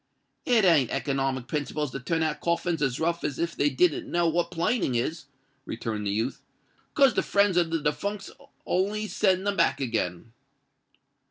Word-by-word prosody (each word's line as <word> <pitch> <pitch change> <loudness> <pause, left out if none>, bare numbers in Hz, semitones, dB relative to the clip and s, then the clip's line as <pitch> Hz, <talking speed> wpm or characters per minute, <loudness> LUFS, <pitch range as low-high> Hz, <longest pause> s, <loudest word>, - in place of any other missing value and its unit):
"It 230 -5 +4
ain't 150 -9 +4
economic 135 -3 -1
principles 150 -1 -2
to 135 - -5
turn 160 +5 -1
out 150 -1 -1
coffins 170 -1 0
as 135 -3 0
rough 170 +1 -1
as 140 - -2
if 170 0 -2
they 145 - +2
didn't 150 +4 +1
know 170 0 +1
what 170 +1 0
planing 170 - 0
is," 155 +6 -2 0.4
returned 110 -3 -4
the - - 0
youth; 110 +6 -2 0.5
"'cause 275 -5 +5
the - - +1
friends 200 -2 +2
of 175 -2 +2
the 165 - 0
defuncks'll 200 +7 -4 0.2
only 205 +4 0
send 190 -2 +1
them 200 0 0
back 170 - +2
again." 115 -5 -3
165 Hz, 170 wpm, -27 LUFS, 135-180 Hz, 0.5 s, cause